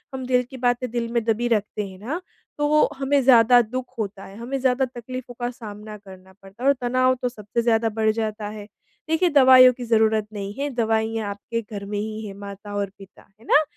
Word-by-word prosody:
हम 260 -1 -5
दिल 250 0 +2
की 265 - -8
बातें 245 0 0
दिल 235 -1 -2
में 235 -1 +1
दबी 230 +1 +1
रखते 210 -2 -1
हैं 190 -1 -12
ना, 280 - -4 0.4
तो 295 +1 +3
हमें 275 +1 +2
ज़्यादा 245 -1 +6
दुःख 250 +3 -4
होता 200 -2 -4
है, 195 - -12
हमें 245 +4 -4
ज़्यादा 260 0 +2
तकलीफ़ों 250 0 -8
का 240 0 -1
सामना 215 -2 -9
करना 190 -2 -15
पड़ता 195 +5 -13
है - - +2
और - - +6
तनाव 255 +1 +2
तो 250 - 0
सबसे 220 -1 -3
ज़्यादा 225 -1 +2
बढ़ 220 0 +1
जाता 215 -1 -3
है। 210 -1 -9 0.4
देखिए, 335 +3 +2
दवाइयों 260 -3 +7
की 250 0 -8
ज़रूरत 220 -2 +2
नहीं 200 -1 -5
है, 285 +1 -1
दवाइयाँ 225 -3 -1
आपके 220 +3 -4
घर 205 -2 -8
में 205 0 -3
ही 215 +1 -5
है, 200 - -7
माता 200 +1 -9
और 200 -1 -1
पिता, 195 -1 -16
है 225 - -19
ना। 295 - +5
230 Hz, 215 wpm, -23 LUFS, 210-255 Hz, 0.4 s, दवाइयों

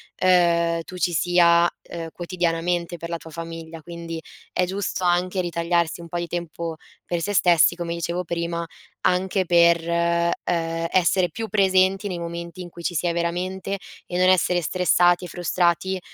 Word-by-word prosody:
ehm, 170 -2 +3
tu 180 +2 -10
ci 175 0 0
sia, 170 +1 +4
ehm, 165 -1 -7
quotidianamente 175 0 -2
per 170 0 -7
la 170 - -2
tua 165 - -12
famiglia, 165 0 -7
quindi 170 0 -7 0.3
è 180 - +1
giusto 190 0 -3
anche 180 +2 +1
ritagliarsi 170 -1 0
un 170 - -9
po' 175 - -3
di 175 - -2
tempo 170 -1 -4 0.3
per 175 -1 -2
se 205 +4 -2
stessi, 175 -2 +5
come 170 -1 -4
dicevo 170 +1 -2
prima, 170 0 -3 0.4
anche 185 +1 +1
per, 170 -1 +4
ehm, 170 0 +1 0.6
essere 180 0 +3
più 225 -1 -5
presenti 190 0 +3
nei 185 -3 -3
momenti 170 +1 -6
in 175 - -8
cui 170 - -11
ci 175 - -2
sia 170 +2 0
veramente 180 +3 -2 0.3
e 175 - -3
non 185 0 +4
essere 180 -1 +3
stressati 175 +1 +3
e - - -6
frustrati 175 +1 0
175 Hz, 165 wpm, -23 LUFS, 170-180 Hz, 0.6 s, stessi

